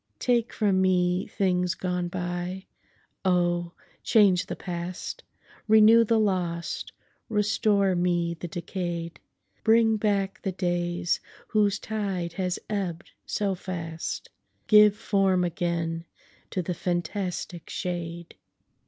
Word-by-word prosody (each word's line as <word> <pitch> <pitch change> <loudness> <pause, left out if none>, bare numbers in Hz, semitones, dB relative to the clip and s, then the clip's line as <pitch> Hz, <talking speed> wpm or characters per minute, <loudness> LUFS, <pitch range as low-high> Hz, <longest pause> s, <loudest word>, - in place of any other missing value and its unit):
Take 240 - +1
from 195 -4 +2
me 180 0 +2
things 180 -2 0
gone 180 -2 -2
by—oh! 175 0 -3 0.3
change 195 -4 +4
the - - -4
past—Renew 210 +5 +1
the 225 +1 +3
lost—restore 200 +2 0
me 175 -1 +1
the 170 +1 -7
decay'd;—Bring 180 +6 -1
back 200 -1 0
the 190 - -2
days 175 -1 0 0.3
whose 210 -2 +2
tide 195 -6 -3
has 180 0 -1
ebb'd 190 -5 -3 0.2
so 200 -2 0
fast—Give 185 +4 +1
form 195 -3 +2
again 170 -1 -2 0.4
to 185 - -2
the 180 - -2
fantastic 175 0 -3
shade! 170 -2 -4
180 Hz, 90 wpm, -27 LUFS, 175-200 Hz, 0.4 s, change